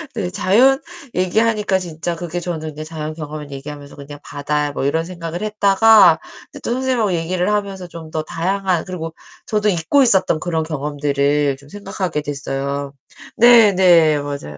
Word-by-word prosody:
네 190 -5 -2
자연 250 +10 +3 0.4
얘기하니까 205 +1 +1
진짜 170 -1 -4
그게 175 +1 -5
저는 160 -3 -5
네 155 - -6
자연 155 -1 -6
경험을 150 -2 -7
얘기하면서 140 +1 -9
그냥 145 0 -10
바다 145 0 -2
뭐 135 - -3
이런 160 +3 0
생각을 170 0 -6
했다가 210 -4 +5 0.4
또 - - -2
선생님하고 245 -6 0
얘기를 175 +3 -1
하면서 195 -3 -3
좀 165 -1 -10
더 155 - -2
다양한 180 +2 -1
그리고 165 -3 -6 0.3
저도 210 -1 +1
잊고 195 - +2
있었던 190 -8 +2
그런 165 -3 -1
경험들을 145 -1 0
좀 140 +1 -18
생각하게 185 -5 -4
됐어요. 140 -1 -4 0.5
네, 235 -3 +7
네 170 -5 +5
맞아요. 140 - -6
165 Hz, 345 characters per minute, -19 LUFS, 150-195 Hz, 0.5 s, 네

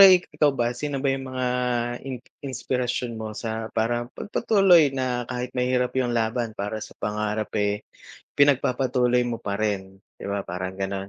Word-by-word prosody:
ikaw 180 -6 +7
ba 120 0 +1
sino 145 +3 -3
ba 135 - +3
yung 135 -1 -4
mga 130 -1 -2 0.6
in 130 - -3 0.2
inspirasyon 125 -3 -2
mo 110 -1 -5
sa, 110 -1 -3
parang 120 +2 +1
pagpatuloy 195 -7 +4
na 125 -2 -1
kahit 125 0 -3
mahirap 125 0 +1
yung 120 -2 0
laban 115 0 -1
para 105 +2 -3
sa - - -9
pangarap, 105 0 -2
eh, 105 +1 0 0.5
pinagpapatuloy 125 -3 +3
mo 120 -1 -3
pa 100 -1 -2
rin 100 -3 -2 0.2
'di - - -7
ba 100 -1 -2
parang 95 +1 -4
ganun? 95 0 -3
120 Hz, 155 wpm, -25 LUFS, 110-130 Hz, 0.6 s, ikaw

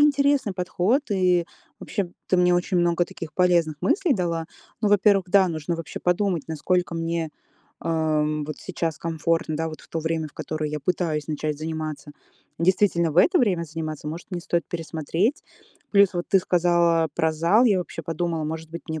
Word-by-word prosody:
интересный 280 -5 +3
подход, 180 +8 +1
и 180 -3 +2 0.3
вообще 195 -5 -3 0.2
ты 185 - +2
мне 180 0 +4
очень 175 +1 0
много 175 0 +2
таких 165 -2 -9
полезных 170 -3 +2
мыслей 335 - +2
дала. 170 -3 -2 0.3
Ну, 215 - +2
во-первых, 200 -2 +4
да, 190 0 +5
нужно 160 +1 -3
вообще 165 -1 -6
подумать, 180 -2 +1
насколько 175 +3 0
мне, 165 -1 -2 0.5
ам, 155 -2 0
вот 155 +1 -6
сейчас 165 -4 -3
комфортно, 165 -1 -1
да, 160 +1 -1
вот 155 - -9
в - - -18
то 165 - -3
время, 160 -1 -2
в - - -22
которое 155 -1 -3
я 150 - -3
пытаюсь 155 -2 -1
начать 150 -1 -2
заниматься. 155 -2 -5 0.5
Действительно 170 -1 +2
в - - -8
это 180 - +5
время 185 -8 +2
заниматься? 155 -1 -6
Может, 160 +6 -6
мне 180 -2 -3
стоит 170 0 -1
пересмотреть. 165 - -1 0.5
Плюс 200 -2 +5
вот 175 0 -2
ты 195 - +5
сказала 170 -2 +2
про 160 0 +1
зал, 170 +10 +3
я 205 -6 +4
вообще 175 -2 -5
подумала, 165 0 -2
может 160 +1 -5
быть, 170 - -7
мне 160 -1 -3
170 Hz, 175 wpm, -24 LUFS, 160-180 Hz, 0.5 s, да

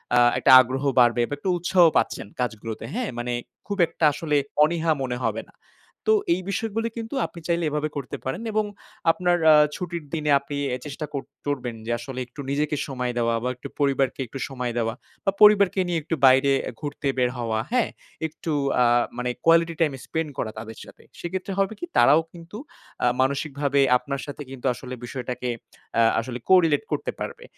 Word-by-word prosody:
আ - - +6 0.2
একটা - - +4
আগ্রহ 130 +2 -3 0.2
বাড়বে 120 0 +4
বা - - -4
একটু 185 - -3
উৎসাহ 175 +1 +3
পাচ্ছেন - - -1
কাজগুলোতে। 110 -2 -4
হ্যাঁ? 250 -2 -2
মানে 120 0 -2 0.3
খুব 200 - -3
একটা 160 - -1
আসলে 150 0 0 0.3
অনীহা 165 +1 +1
মনে 125 -2 -2
হবে - - -1
না। - - -22 0.6
তো - - +7 0.2
এই 180 - -2
বিষয়গুলো 225 +1 -1
কিন্তু 225 +3 -5
আপনি 170 - -9
চাইলে 170 0 +1
এভাবে 150 +1 -1
করতে 140 -3 -5
পারেন 135 +10 -3
এবং 215 0 +1 0.5
আপনার 175 0 +1
আ - - +9 0.2
ছুটির 175 -2 -5
দিনে 150 -2 0
আপনি 140 +1 -6 0.2
এ - - -4
চেষ্টা 150 +1 -5
কর 140 -1 -3 0.2
করবেন 125 -5 -2
যে 115 - -3
আসলে 130 +1 -6
একটু 125 +4 -9
নিজেকে 150 +2 0
সময় 125 -2 -2
দেওয়া 115 -1 +1
বা 125 - 0
একটু 125 - -8
পরিবারকে 135 -2 +1
একটু 135 - -8
সময় 125 -2 -3
দেওয়া 115 -1 0 0.3
বা 195 - +3
পরিবারকে 205 -2 +6
নিয়ে 170 -2 0
একটু 165 - -2
বাইরে 135 +1 +6 0.2
আ - - -6
ঘুরতে 145 -1 -4
বের 125 -1 +2
হওয়া, 115 -2 -1
হ্যাঁ? 250 -2 +2 0.4
একটু 160 +1 -6 0.3
আ - - +5 0.3
মানে 125 0 -2 0.2
কোয়ালিটি 165 0 +4
টাইম 150 -4 +3
স্পেন্ড 160 -1 -2
করা 110 - -2
তাদের 110 0 -9
সাথে। - - -16 0.2
সেক্ষেত্রে 185 +3 -4
হবে 195 +2 +1
কি - - -4
তারাও 145 +6 +6
কিন্তু 170 +4 -10 0.5
আ - - +5
মানসিকভাবে 140 +1 0 0.2
আপনার 140 +2 -5
সাথে 145 0 -8
কিন্তু 135 -1 -9
আসলে 125 +2 -8
বিষয়টাকে 125 -1 -4 0.5
আ - - +6 0.2
আসলে 120 +1 -5
corelate 175 -1 +4
করতে - - -1
পারবে। 480 0 -6
145 Hz, 185 wpm, -24 LUFS, 125-170 Hz, 0.6 s, আ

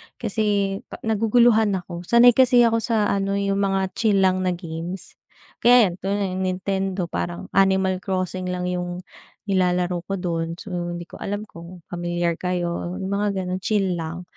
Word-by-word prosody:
Kasi, 205 -3 0
ka - - -9
naguguluhan 220 -1 +3
ako. 175 -1 -7
Sanay 240 +1 +7
kasi 250 0 +5
ako 230 -1 +3
sa 220 -3 +1
ano 195 0 0
yung 200 0 0
mga 195 -1 0
chill 205 -4 +3
lang 185 0 +2
na 180 - 0
games. 170 +1 -7 0.4
Kaya 240 -5 +6
yan, - - -7
tulad 195 +2 -1
niyan 185 -1 -3 0.2
Nintendo, 190 0 -2
parang 175 0 -4
Animal 190 -1 +2
Crossing 185 -1 -3
lang 180 0 -3
yung 180 0 -4 0.4
nilalaro 180 -3 0
ko 195 - -2
dun. 165 -3 -3
So 200 +3 -10
hindi 175 -1 -4
ko 170 - -13
alam 205 +1 -3
kung 170 -3 -12
pamilyar 175 -1 -2
kayo, 175 -1 -2
mga 200 0 -1
ganun, 180 +1 -3
chill 190 -3 0
lang. 165 +2 -5
190 Hz, 165 wpm, -23 LUFS, 175-200 Hz, 0.4 s, Sanay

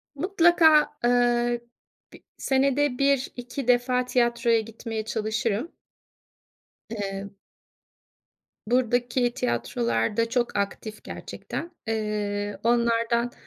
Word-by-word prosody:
Mutlaka, 330 -2 +4
ııı, 240 0 +2 0.5
bi - - -15
senede 275 0 +1
1-2 270 -2 -1
defa 250 0 +2
tiyatroya 235 -2 +2
gitmeye 225 0 -6
çalışırım. 220 +4 -2 1.2
Eee 200 -2 -5 1.3
Buradaki 245 0 +1
tiyatrolar 120 - -1
da 230 0 +1
çok 245 0 -1
aktif 210 +2 -4
gerçekten. 340 - -7 0.2
Eee, 210 -2 -2
onlardan 235 0 +2
235 Hz, 80 wpm, -25 LUFS, 215-250 Hz, 1.3 s, Mutlaka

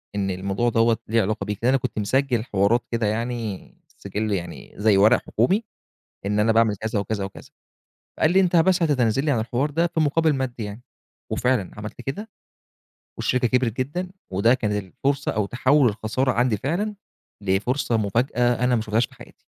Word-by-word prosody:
إن 100 -1 -1
الموضوع 100 +5 -1
دوّة 115 0 +3
ليه 115 +1 +2
علاقة 105 +2 -1
بيك." 105 -1 -4
لأن 120 - +3
أنا - - +4
كنت 120 -4 -4
مسجل 120 +2 +1
حوارات 100 +3 +2
كده 115 -2 0
يعني، 115 -2 -3 0.2
السجل 105 +2 -4
يعني 90 -3 -6
زي 105 -1 +3
ورق 110 +4 +5
حكومي، 185 - +1 0.6
إن 105 +1 0
أنا 110 +2 +3
باعمل 110 -2 +3
كذا 110 +1 -2
وكذا 100 0 -2
وكذا، 95 - -9 0.7
قال 155 - +4
لي: 190 - +4
"أنت 180 -2 +2
بس 175 +2 +4
هتتنازل 135 -3 +2
لي 150 - +2
عن 120 - +1
الحوار 125 +6 -1
ده، 165 +4 +1
في 165 -1 -3
مقابل 155 +1 +2
مادي 125 -3 -3
يعني." 105 +3 -7 0.5
وفعلًا 125 -6 0
عملت 105 +3 -7
كده، 205 - -5 0.9
والشركة 125 -1 +1
كبرت 125 -2 0
جدًا، 175 +8 -3 0.2
وده 100 +6 +3
كان 110 -5 -1
الفرصة 135 +8 -2
أو 105 -2 0
تحوُّل 130 +3 +3
الخسارة 110 +5 -1
عندي 120 -3 +1
فعلًا 190 - -2 0.5
لفرصة 115 +6 0
مفاجأة، 120 +3 +1
أنا 125 0 +3
ما 110 - 0
شُفتهاش 110 +2 +1
في - - -22
حياتي. - - -14
115 Hz, 180 wpm, -23 LUFS, 105-135 Hz, 0.9 s, ورق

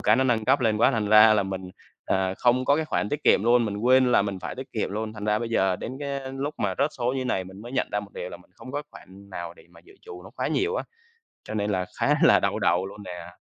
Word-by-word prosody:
cái 110 - +4
nó 130 - +2
nâng 115 -4 +1
cấp 140 - +3
lên 110 -3 +2
quá 115 +4 +4
thành 110 -5 -1
ra 110 +1 +8
là 105 - +2
mình, 95 -1 -6 0.3
à, 95 0 0
không 125 +1 +2
có 140 +2 +3
cái 160 - -1
khoản 105 - -1
tiết 145 +4 -4
kiệm 95 - +5
luôn, 120 0 +4
mình 105 -2 -3
quên 125 +3 +4
là - - +5
mình 100 -1 -4
phải - - -5
tiết 130 0 -9
kiệm 110 - -2
luôn, 110 +2 -4
thành 105 -1 -8
ra 105 0 +1
bây 115 0 -4
giờ 95 -5 +1
đến 120 - -6
cái 140 -1 -3
lúc 140 +3 -4
mà 95 -2 -1
rớt 140 +2 +2
số 125 +1 0
như 130 - -2
này 95 -6 -1
mình 95 +2 -12
mới 120 - -9
nhận - - 0
ra 105 - 0
một 100 -1 -12
điều 90 - -5
là - - -8
mình 90 - -23
không 130 - -11
có 145 +1 -3
cái 150 - -41
khoản 100 +1 -15
nào 85 -2 -6
để - - -19
mà 85 -1 -18
dự - - -19
trù 90 0 -10
nó 95 - -12
quá - - -1
nhiều 415 - 0
á, - - -3 0.6
cho - - -7
nên 105 -1 -1
là 95 -2 -1
khá - - +3
là - - +6
đau - - -1
đầu 90 +2 +2
luôn 100 +2 -9
nè. 90 -3 -9
110 Hz, 305 wpm, -25 LUFS, 95-130 Hz, 0.6 s, ra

